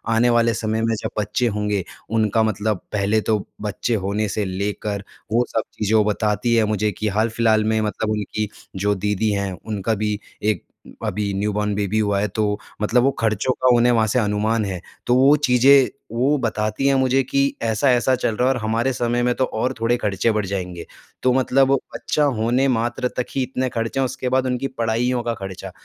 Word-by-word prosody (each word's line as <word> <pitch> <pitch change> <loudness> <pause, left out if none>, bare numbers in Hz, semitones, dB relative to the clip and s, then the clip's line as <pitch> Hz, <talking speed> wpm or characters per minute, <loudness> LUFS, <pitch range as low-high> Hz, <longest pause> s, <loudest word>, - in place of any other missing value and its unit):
आने 120 +2 +4
वाले 115 -1 +3
समय 110 0 -1
में 115 0 +1
जब - - -3
बच्चे 120 +4 0
होंगे 105 -3 -1 0.3
उनका 110 0 +2
मतलब 105 -2 -1
पहले 105 +1 +1
तो 110 0 +1 0.2
बच्चे 105 +3 -1
होने 105 +2 0
से 105 0 -1
लेकर 100 +1 -3 0.3
वो 120 +2 +3
सब 110 - 0
चीज़ें 105 0 +2
बताती 105 +2 +1
है 110 -2 +4
मुझे 105 0 0
कि 105 +3 -3
हाल-फिलहाल 110 +1 +2
में 110 0 +1
मतलब 110 +1 -2
उनकी 105 0 -2 0.3
जो 100 +2 +1
दीदी 105 +2 0
हैं 100 -1 -1
उनका 110 0 -1
भी 105 0 -1 0.2
एक 105 0 0 0.4
अभी 105 -1 -2
न्यूबॉर्न 105 +1 -1
बेबी 105 +1 0
हुआ 100 -2 +1
है। 105 - +1
तो 105 0 -1 0.2
मतलब 120 +3 +3
वो 135 - +3
ख़र्चों 110 +3 +1
का 125 -1 +5
उन्हें 120 +1 +4
वहाँ 110 -2 +3
से 125 +4 +1
अनुमान 105 +1 0
है 95 -3 -4 0.3
तो 120 - +4
वो 135 +3 +6
चीज़ें 130 +2 +6 0.2
वो 135 +5 +2
बताती 110 +2 -1
हैं 135 - +4
मुझे 130 0 +3
कि 140 +2 -1 0.2
ऐसा-ऐसा 120 +3 +2
चल 115 -3 -1
रहा 125 - +2
है 135 - +4
और 125 - -3
हमारे 115 +4 +1
समय 120 0 0
में 125 0 +2
तो 130 - +1
और 110 +4 -2
थोड़े 115 +2 +2
ख़र्चे 105 +1 0
बढ़ 105 -2 -1
जाएँगे। 90 -3 -4 0.4
तो 130 - +4
मतलब 130 +1 +3
वो 135 - +4 0.2
बच्चा 150 - 0 0.2
होने 125 +4 +2
मात्र 120 0 0
तक 125 - 0
ही 135 - +1
इतने 130 0 -2
ख़र्चे 115 +3 -2
हैं 135 - +2
उसके 130 0 -3
बाद 130 0 +2
उनकी 125 +1 -1
पढ़ाइयों 120 0 -1
का 120 0 -1
ख़र्चा। 95 -1 -7
110 Hz, 200 wpm, -21 LUFS, 105-125 Hz, 0.4 s, वो